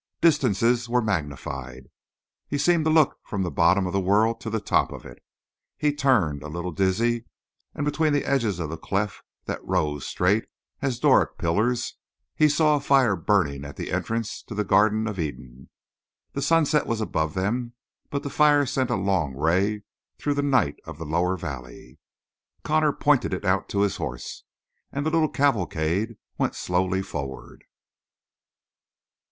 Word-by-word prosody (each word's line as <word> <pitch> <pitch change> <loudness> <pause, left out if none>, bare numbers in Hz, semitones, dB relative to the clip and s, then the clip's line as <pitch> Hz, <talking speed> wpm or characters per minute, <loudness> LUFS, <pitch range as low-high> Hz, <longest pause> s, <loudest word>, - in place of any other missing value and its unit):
Distances 120 - +2
were 125 0 +2
magnified; 70 - -4 0.6
he 145 - -2
seemed 170 +1 +2
to - - +3
look 155 -3 +3
from 100 -2 -3
the 90 - -2
bottom 90 +3 +3
of 90 - -3
the 100 - +2
world 105 +5 +2
to 115 - -4
the 110 0 -1
top 105 - +1
of - - -9
it; - - -12 0.6
he 150 -1 +1
turned, 110 - +2
a 75 - -7
little 85 +3 -4
dizzy, 110 +6 +1 0.5
and 145 - -2
between 155 +1 +1
the 145 -1 +1
edges 115 -9 +1
of 80 -3 -4
the 80 - -6
cleft 100 +3 -2 0.2
that - - -4
rose 75 -6 -1
straight 100 +5 +1 0.4
as 135 -4 -1
Doric - - +3
pillars, 115 +8 0 0.4
he 155 -1 +4
saw 150 0 +3
a - - +1
fire 135 -6 +3
burning 80 -6 +1
at 70 0 -8
the - - -5
entrance 115 -1 -2
to 110 - -7
the 105 - 0
Garden 110 +2 +3
of 105 -4 -4
Eden. 65 -5 -6 0.6
The 140 - -3
sunset 155 -1 +2
was 115 -2 -1
above 80 -8 -1
them, 120 +6 -1 0.4
but 140 - -3
the 140 - -5
fire 145 -1 +4
sent 130 -1 -1
a 120 - +1
long 90 - 0
ray 95 +8 +1 0.3
through 145 - -1
the 145 - 0
night 130 - +2
of - - -9
the 80 - -6
lower 85 +4 0
valley. 70 -8 -8 0.6
Connor 155 -1 +2
pointed 145 -9 +2
it 95 - -7
out 95 0 +1
to 100 - 0
his 100 -2 +1
horse, 60 -1 -6 0.5
and 140 +1 -3
the 155 - +1
little 160 -2 +2
cavalcade 105 - 0 0.2
went - - 0
slowly 95 +1 0
forward. 70 -6 -7
105 Hz, 170 wpm, -25 LUFS, 85-135 Hz, 0.6 s, he